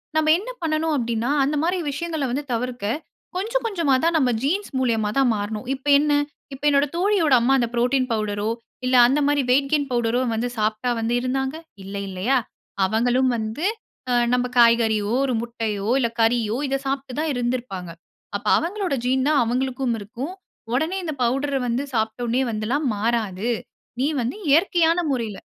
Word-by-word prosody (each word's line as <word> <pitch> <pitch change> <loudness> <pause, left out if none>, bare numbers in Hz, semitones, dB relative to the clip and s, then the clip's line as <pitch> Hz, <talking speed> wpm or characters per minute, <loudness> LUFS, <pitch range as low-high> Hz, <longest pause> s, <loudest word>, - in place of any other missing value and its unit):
நம்ம 315 0 +2
என்ன 435 +7 -7
பண்ணணும் 315 -1 0
அப்பிடின்னா, 235 0 -1
அந்தமாரி 305 +6 0
விஷயங்கள 315 0 -3
வந்து 285 +4 -2
தவிர்க்க 245 -1 -3 0.5
கொஞ்சம் 455 +7 -1
கொஞ்சமா 335 -11 +2
தான் 335 0 +2
நாம் 265 -5 +2
ஜீன்ஸ் 380 +8 -1
மூலியமா 225 -5 +1
தான் 270 -2 +4
மாறணும். 210 +2 -4
இப்ப 275 +2 -8
என்ன? 295 +1 +1 0.4
இப்ப 270 - -11
என்னோட 280 0 +4
தோழியோட 355 -5 +2
அம்மா 260 +3 +3
அந்த 240 -2 +1
புரோட்டீன் 250 +2 +1
பவுடரோ! 210 -1 -1 0.4
இல்ல 255 0 +2
அந்தமாரி 285 +2 +2
வெயிட் 275 +2 +3
கெயின் 290 -2 +2
பவுடரோ 240 0 +1
வந்து 225 +2 -1
சாப்பிட்டா 215 +3 0
வந்து 225 +1 -1
இருந்தாங்க! 265 +2 -1 0.3
இல்லை, 200 +1 -5
இல்லயா! 200 +9 +1 0.5
அவங்களும் 245 +5 +2
வந்து 220 +10 -3 0.5
அ - - +3 0.2
நம்ம 250 0 +2
காய்கறியோ! 225 -3 +4
ஒரு 260 - -1
முட்டையோ! 225 -3 -3
இல்ல 235 -3 +1
கறியோ! 225 -1 +2
இத 270 - 0
சாப்ட்டு 270 -1 -3
தான் 310 -1 0
இருந்துருப்பாங்க. 240 -8 -3 0.5
அப்ப - - -17
அவங்களோட 370 -2 -2
ஜீன் 260 +2 +1
தான் 305 -2 +4
அவங்களுக்கும் 255 +1 -1
இருக்கும். 250 - -6 0.4
உடனே 315 +9 0
இந்த 310 -4 -4
பவுடர 270 +3 0
வந்து 240 +3 0
சாப்பிட்டோனே 230 +3 0
வந்துலாம் 240 +7 -1
மாறாது. 220 -1 -1 0.5
நீ 275 - +2
வந்து 240 +2 -2
இயற்கையான 335 +2 +4
முறையில. 230 -6 -3
255 Hz, 155 wpm, -23 LUFS, 230-290 Hz, 0.5 s, தான்